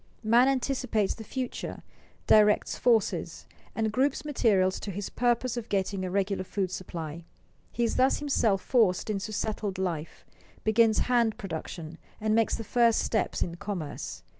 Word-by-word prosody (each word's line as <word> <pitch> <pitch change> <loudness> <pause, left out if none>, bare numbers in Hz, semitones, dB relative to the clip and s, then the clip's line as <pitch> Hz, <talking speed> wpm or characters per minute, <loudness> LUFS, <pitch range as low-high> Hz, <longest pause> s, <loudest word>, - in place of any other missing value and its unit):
Man 235 +4 +5
anticipates 255 -5 0
the 225 - -9
future, 255 +3 -5 0.4
directs 210 -1 +4
forces, 230 -3 +1 0.3
and 220 -1 0
groups 270 +6 0
materials 200 -10 +2
to - - -6
his 200 +1 -5
purpose 245 0 0
of 235 -1 -5
getting 195 -1 -1
a 185 - -2
regular 195 0 0
food 190 -1 -2
supply. 170 -3 -6 0.5
He 240 - -1
is 230 - 0
thus 260 +1 +4
himself 225 -9 +1
forced 215 -4 +2
into 205 +1 -3
settled 210 -2 -3
life, 170 -4 -4 0.4
begins 220 0 +4
hand 235 -3 +2
production, 165 -3 -6 0.2
and 215 0 0
makes 225 0 +2
the 225 - -5
first 235 +1 +3
steps 220 -4 0
in 170 0 -6
commerce. 170 -7 -5
215 Hz, 150 wpm, -28 LUFS, 190-235 Hz, 0.5 s, Man